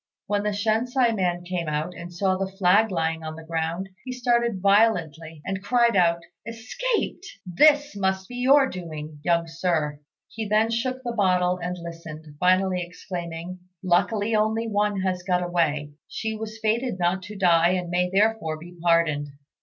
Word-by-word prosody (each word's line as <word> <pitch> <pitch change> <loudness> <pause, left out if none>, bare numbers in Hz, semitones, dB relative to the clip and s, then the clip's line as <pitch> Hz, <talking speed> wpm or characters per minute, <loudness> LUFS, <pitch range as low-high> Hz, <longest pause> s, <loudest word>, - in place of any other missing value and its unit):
When 205 -1 0
the 210 - 0
Shensi 225 +4 +1
man 175 -3 -1
came 175 -2 -3
out, 155 +4 -2
and 175 +1 -8
saw 185 +2 0
the 190 0 -2
flag 195 +3 +3
lying 165 -3 -1
on 155 0 -5
the 165 - -10
ground, 165 +3 -3
he 255 - -6
started 235 -4 +1
violently, 165 -7 +2
and 190 0 -3
cried 235 +1 +3
out, 170 -2 +3 0.2
"Escaped! 350 - -3 0.2
This 290 - +4
must 190 -1 -1
be 245 - -8
your 270 +2 +5
doing, 155 - -7
young 170 0 +2
Sir." 160 -3 -1 0.3
He 220 -1 -5
then 215 +2 +2
shook 255 +3 -2
the 240 - -2
bottle 180 -3 +2
and 180 0 -3
listened, 165 -2 -9
finally 185 0 +3
exclaiming, 175 0 -6 0.2
"Luckily 205 +4 +1
only 220 +2 +1
one 205 -2 0
has 185 -1 -1
got 180 -1 0
away. 155 -4 0 0.2
She 220 0 -4
was 220 0 -6
fated 225 0 0
not 180 +1 0
to 210 +3 -9
die, 175 -2 +4
and 180 -2 -2
may 180 0 +1
therefore 200 -5 +1
be 175 +3 -12
pardoned." 165 -4 +2
185 Hz, 165 wpm, -25 LUFS, 170-220 Hz, 0.3 s, your